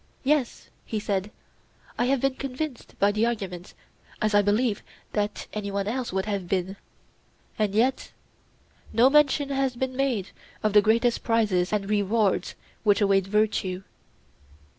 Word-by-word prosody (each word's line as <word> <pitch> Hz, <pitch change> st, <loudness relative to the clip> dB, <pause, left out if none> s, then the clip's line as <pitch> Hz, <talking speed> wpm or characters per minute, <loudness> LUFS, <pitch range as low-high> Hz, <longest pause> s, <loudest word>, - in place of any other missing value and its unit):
Yes, 280 Hz, -3 st, 0 dB
he 220 Hz, -, -3 dB
said; 200 Hz, -1 st, -2 dB, 0.7 s
I 245 Hz, -, +1 dB
have 265 Hz, 0 st, +1 dB
been 270 Hz, -1 st, +2 dB
convinced 270 Hz, +1 st, -6 dB
by 200 Hz, +1 st, +3 dB
the 215 Hz, +3 st, +1 dB
argument, 195 Hz, -6 st, -5 dB, 0.4 s
as 215 Hz, -1 st, 0 dB
I 205 Hz, -, +6 dB
believe 210 Hz, +2 st, +1 dB, 0.3 s
that 205 Hz, 0 st, -2 dB
any 210 Hz, -1 st, -3 dB
one 200 Hz, 0 st, -2 dB
else 245 Hz, +2 st, -2 dB
would 190 Hz, +1 st, -1 dB
have 200 Hz, -4 st, -3 dB
been. 190 Hz, +1 st, -1 dB, 0.8 s
And 210 Hz, -2 st, 0 dB
yet 250 Hz, +4 st, +1 dB, 0.8 s
no 250 Hz, +4 st, +5 dB
mention 290 Hz, -1 st, +4 dB
has 270 Hz, -2 st, 0 dB
been 260 Hz, +1 st, -3 dB
made 255 Hz, -8 st, 0 dB, 0.3 s
of 215 Hz, -1 st, +1 dB
the 210 Hz, -, +7 dB
greatest 230 Hz, +3 st, +2 dB
prizes 210 Hz, -6 st, +1 dB
and 205 Hz, -2 st, -1 dB
rewards 205 Hz, 0 st, +1 dB, 0.3 s
which 205 Hz, -1 st, +3 dB
await 195 Hz, -2 st, +3 dB
virtue. 195 Hz, -3 st, 0 dB
215 Hz, 145 wpm, -26 LUFS, 200-250 Hz, 0.8 s, the